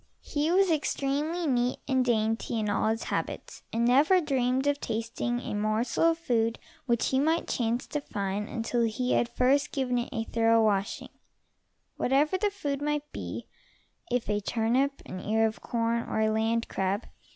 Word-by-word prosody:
He 295 Hz, +1 st, -1 dB
was 375 Hz, +1 st, +4 dB
extremely 300 Hz, +2 st, 0 dB
neat 250 Hz, -3 st, +1 dB
and 260 Hz, -2 st, +2 dB
dainty 225 Hz, -1 st, 0 dB
in 210 Hz, -1 st, -1 dB
all 205 Hz, -, +1 dB
his 225 Hz, +1 st, -1 dB
habits, -, -, -4 dB
and 230 Hz, +1 st, +1 dB
never 285 Hz, +10 st, +5 dB
dreamed 265 Hz, -4 st, 0 dB
of 285 Hz, 0 st, +1 dB
tasting 230 Hz, +1 st, -2 dB
a -, -, -5 dB
morsel 215 Hz, +7 st, +1 dB
of 330 Hz, 0 st, +4 dB
food 230 Hz, -7 st, 0 dB, 0.3 s
which 235 Hz, -2 st, +2 dB
he 265 Hz, -, +2 dB
might 320 Hz, +4 st, +1 dB
chance 235 Hz, +1 st, -1 dB
to 295 Hz, -, -3 dB
find 200 Hz, -4 st, -3 dB
until 235 Hz, +1 st, -1 dB
he 235 Hz, +2 st, 0 dB
had 240 Hz, -, +2 dB
first 270 Hz, +4 st, +2 dB
given 250 Hz, -3 st, 0 dB
it 240 Hz, -, -3 dB
a 225 Hz, -, -2 dB
thorough 225 Hz, 0 st, +3 dB
washing, 200 Hz, -2 st, -1 dB, 0.9 s
whatever 290 Hz, +7 st, +2 dB
the 410 Hz, +2 st, +1 dB
food 290 Hz, -8 st, -3 dB
might 295 Hz, 0 st, -2 dB
be, -, -, -6 dB, 0.6 s
if 245 Hz, -1 st, -1 dB
a 210 Hz, 0 st, 0 dB
turnip, 245 Hz, +7 st, 0 dB
an 185 Hz, -, -6 dB
ear 220 Hz, +3 st, +1 dB
of 220 Hz, 0 st, -3 dB
corn 235 Hz, 0 st, 0 dB
or -, -, -1 dB
a 220 Hz, 0 st, +3 dB
land 225 Hz, +1 st, 0 dB
crab. 195 Hz, +3 st, -1 dB
240 Hz, 175 wpm, -28 LUFS, 225-285 Hz, 0.9 s, never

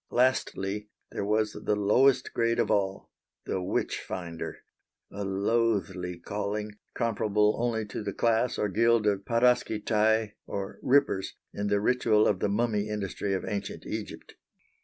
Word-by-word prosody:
Lastly 105 Hz, -5 st, 0 dB, 0.2 s
there -, -, -3 dB
was 105 Hz, +1 st, +1 dB
the 105 Hz, -, -1 dB
lowest 115 Hz, +7 st, +3 dB
grade 115 Hz, 0 st, +1 dB
of -, -, +1 dB
all, 95 Hz, -1 st, -1 dB, 0.3 s
the 95 Hz, -, -2 dB
Witch 90 Hz, -, -1 dB
finder 85 Hz, -3 st, -6 dB, 0.5 s
a 100 Hz, +1 st, -5 dB
loathly 95 Hz, -3 st, 0 dB
calling, 105 Hz, +3 st, -3 dB, 0.2 s
comparable 105 Hz, -2 st, +2 dB
only 115 Hz, -2 st, 0 dB
to 105 Hz, -, -6 dB
the 105 Hz, -1 st, -3 dB
class 115 Hz, +4 st, +1 dB
or 105 Hz, -, +1 dB
guild 115 Hz, +2 st, +3 dB
of 100 Hz, -1 st, +1 dB
"paraskistae" 110 Hz, -2 st, +2 dB, 0.2 s
or 100 Hz, 0 st, -5 dB
"rippers" 130 Hz, -8 st, +2 dB, 0.2 s
in 100 Hz, 0 st, -2 dB
the 100 Hz, 0 st, +2 dB
ritual 110 Hz, -1 st, +3 dB
of 95 Hz, -, +1 dB
the 100 Hz, -, 0 dB
Mummy 105 Hz, 0 st, 0 dB
industry 100 Hz, -1 st, -2 dB
of 95 Hz, -, -3 dB
ancient 100 Hz, -2 st, -4 dB
Egypt. -, -, -6 dB
105 Hz, 140 wpm, -28 LUFS, 100-115 Hz, 0.5 s, lowest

